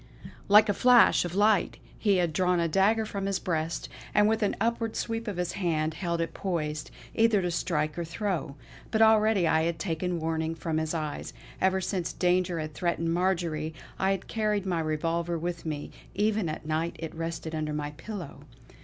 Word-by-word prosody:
Like 210 +2 +8
a 205 - +2
flash 245 -4 +5
of 175 +1 -5
light 205 -1 +3 0.2
he 205 -3 +3
had 175 -3 +1
drawn 180 +1 +2
a 170 - +2
dagger 205 +6 +3
from 200 -2 -3
his 195 -1 0
breast; 165 -3 -2 0.3
and 210 0 +5
with 220 +1 +1
an 205 - +1
upward 230 0 0
sweep 230 0 -3
of 205 -4 -3
his 180 -1 -1
hand 160 -4 -1
held 170 +1 -2
it 165 - -3
poised, 155 -5 -3 0.2
either 225 -2 +4
to 180 -2 -1
strike 165 -2 -1
or - - -1
throw. 170 -4 -3 0.3
But 220 0 +3
already 220 -4 +4
I 160 0 +3
had 165 0 0
taken 175 0 -2
warning 160 0 -1
from 160 -1 -2
his 160 +1 -2
eyes. 155 -2 -4 0.3
Ever 190 0 +2
since 185 -2 -2
danger 180 -1 +1
had 155 -1 -5
threatened 165 -1 -1
Marjory, 170 -4 0 0.2
I 190 - +2
had 195 -1 -1
carried 210 -3 0
my 180 -3 0
revolver 165 +2 -1
with 170 0 -4
me; 150 -2 -4 0.2
even 210 -4 +1
at 155 0 -6
night 160 +2 -1
it 165 -1 -6
rested 165 0 -4
under 155 -1 -2
my 150 0 -3
pillow. 180 +1 -8
175 Hz, 190 wpm, -28 LUFS, 160-200 Hz, 0.3 s, Like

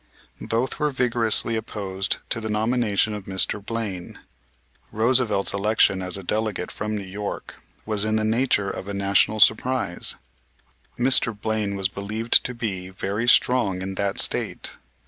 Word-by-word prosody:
Both 120 +5 -1
were 150 -1 +1
vigorously 120 -3 +1
opposed 95 -3 -3
to 115 - 0
the 110 - -4
nomination 110 -1 +1
of 105 -2 -7
Mr. 95 +1 0
Blaine. 105 -5 -5 0.7
Roosevelt's 110 -3 +2
election 100 -1 +2
as 90 +1 -1
a 100 - -8
delegate 105 -1 -2
from 105 +1 -4
New 100 - -5
York 100 +2 -7 0.2
was 105 -2 +2
in 110 0 +2
the 110 - +1
nature 110 -3 +1
of 95 - -7
a 100 - -4
national 100 +2 +2
surprise. 110 -2 +2 0.8
Mr. 120 -4 +3
Blaine 105 -2 -2
was 95 -1 0
believed 105 +4 +2
to 125 - -4
be 95 -6 -4
very 100 +5 -3
strong 110 -7 +3
in 95 0 -4
that 100 0 -2
State. - - 0
105 Hz, 145 wpm, -23 LUFS, 100-115 Hz, 0.8 s, Mr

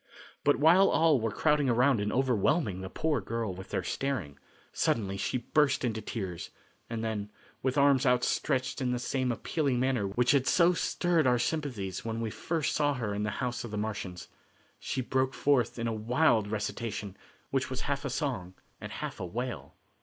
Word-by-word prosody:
But 145 - +4
while 170 +6 +6
all 160 -6 +4
were 115 - 0
crowding 150 +4 +2
around 125 +1 +3
and 105 +1 -1
overwhelming 125 - +1
the 95 - -6
poor 155 -2 0
girl 110 0 -3
with 95 +1 -10
their - - -2
staring, 105 - -3 0.3
suddenly 100 -4 0
she 100 +6 -1
burst 140 +2 +2
into 110 -2 -2
tears, 95 -6 -5 0.4
and 115 -1 -3
then, 105 -2 -3 0.3
with 130 +1 0
arms 140 -2 +5
outstretched 130 +1 +1
in 125 -1 0
the - - 0
same 130 +1 -1
appealing 135 +2 -1
manner 125 -5 +1
which 120 +5 +2
had 140 -2 +2
so 175 0 +5
stirred 170 -3 +1
our 125 -1 +4
sympathies 120 - -2
when 115 0 -3
we 115 -1 -2
first 160 +3 -1
saw 145 -1 +2
her 110 -5 -2
in 100 - -2
the 105 - 0 0.2
house 120 -1 -3
of 120 - -6
the 105 - -4
Martians, 95 -6 -4 0.5
she 130 - -2
broke 130 +1 0
forth 130 -6 +2
in 115 - -2
a 115 - 0
wild 110 0 +2
recitation, 105 -1 -4 0.4
which 135 -1 0
was 130 0 -4
half 140 0 -2
a 140 - -2
song 125 - -3 0.2
and - - -7
half - - -5
a - - -3
wail. 120 +7 -5
125 Hz, 185 wpm, -30 LUFS, 105-140 Hz, 0.5 s, while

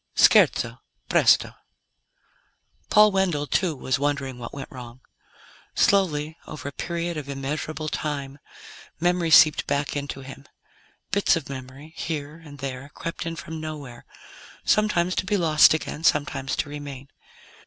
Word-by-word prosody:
SCHERZO - - +4 0.3
PRESTO - - +4 1.4
Paul 210 0 +6
Wendell, 180 -7 +1
too, 170 +1 0
was 130 -1 -1
wondering 140 -3 -2
what 115 - -7
went 140 -1 -8
wrong. 125 -1 -10 0.7
Slowly, 160 -5 +2
over 150 -2 -7
a - - -4
period 170 +2 -3
of 145 -2 -6
immeasurable 150 +3 -4
time, 145 -2 -4 0.6
memory 175 0 +1
seeped 155 -1 +6
back 145 +1 -1
into 140 -1 -4
him. 135 +1 -11 0.6
Bits 200 0 +3
of 165 -4 -5
memory, 135 +3 -9
here 155 -2 -4
and 145 -2 -12
there, 135 0 -6
crept 170 0 -5
in 165 - -3
from 160 -1 -7
nowhere, 145 -6 -8 0.6
sometimes 185 -4 +2
to - - 0
be 205 +1 +2
lost 160 -4 +6
again, 160 0 -5
sometimes 145 -4 +1
to 145 - -2
remain. 140 -2 -8
150 Hz, 135 wpm, -24 LUFS, 140-165 Hz, 1.4 s, Paul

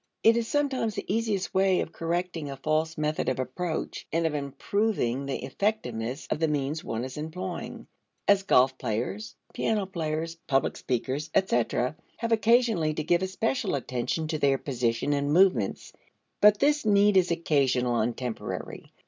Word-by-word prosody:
It 225 +1 +6
is 235 -1 0
sometimes 265 -6 0
the - - -4
easiest 210 -2 -1
way 190 -1 +3
of - - -3
correcting 170 -2 -3
a 135 - -6
false 155 +3 0
method 155 0 0
of 130 - -1
approach, 160 +6 -3
and 165 0 +1
of 160 - 0
improving 140 - -1
the 135 - -3
effectiveness 130 - -2
of - - 0
the 160 - +2
means 150 +1 -1
one 115 +2 -3
is 130 +1 -6
employing, 175 +4 -5 0.4
as 200 -1 +5
golf 130 -9 +3
players, 110 -2 -3 0.2
piano 210 -3 0
players, 165 -2 -3
public 135 0 +1
speakers, 130 +4 -2
etc., 125 -6 +1 0.2
have 230 0 -3
occasionally 225 -8 +3
to 155 - -2
give 170 +3 +2
especial 200 - -1
attention 130 +4 -2
to 155 -2 -1
their 140 -1 +3
position 125 0 -1
and 145 0 0
movements. 160 - +2 0.5
But 210 0 +7
this 295 +5 +2
need 205 -1 +4
is 185 -1 +4
occasional 135 -7 +1
and 115 +1 0
temporary. 125 -3 -5
155 Hz, 155 wpm, -27 LUFS, 130-195 Hz, 0.5 s, But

